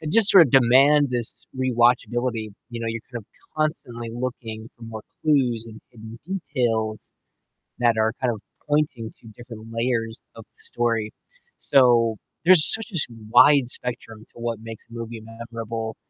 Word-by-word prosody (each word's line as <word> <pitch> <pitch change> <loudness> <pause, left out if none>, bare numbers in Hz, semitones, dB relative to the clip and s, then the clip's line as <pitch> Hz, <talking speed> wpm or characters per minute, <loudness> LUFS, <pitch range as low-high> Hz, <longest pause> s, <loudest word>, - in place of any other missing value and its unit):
that 155 -1 -6
just 220 -1 +8
sort 190 -4 +8
of - - -8
demand 135 +3 +4
this 120 -2 +1
rewatchability. 120 -2 0 0.2
You 115 -1 -7
know, 115 - -5
you're 115 0 -5
kind 120 -3 -7
of - - -28 0.3
constantly 120 -7 -4
looking 115 -2 -7
for 120 - -20
more 110 -1 -9 0.2
clues, 125 -7 0
and 110 -1 -13
hidden 110 0 -13
details 120 - -3 0.7
that 120 -2 +1
are 110 +1 0
kind 125 -2 0
of 110 - -11 0.3
pointing 145 -7 -2
to 115 - -16
different 115 -2 -12
layers 115 -1 -3
of 115 - -12
the - - -35
story. 115 -2 -3 0.5
So, 120 -4 +2 0.3
there's 180 -4 +9
such 225 0 -1
a - - -3 0.3
wide 140 +2 +5
spectrum 120 -3 -4
to - - -16
what 115 -2 -4
makes 115 -1 -11
a - - -16
movie 115 -1 -8
memorable. 115 0 -8
120 Hz, 160 wpm, -22 LUFS, 115-130 Hz, 0.7 s, there's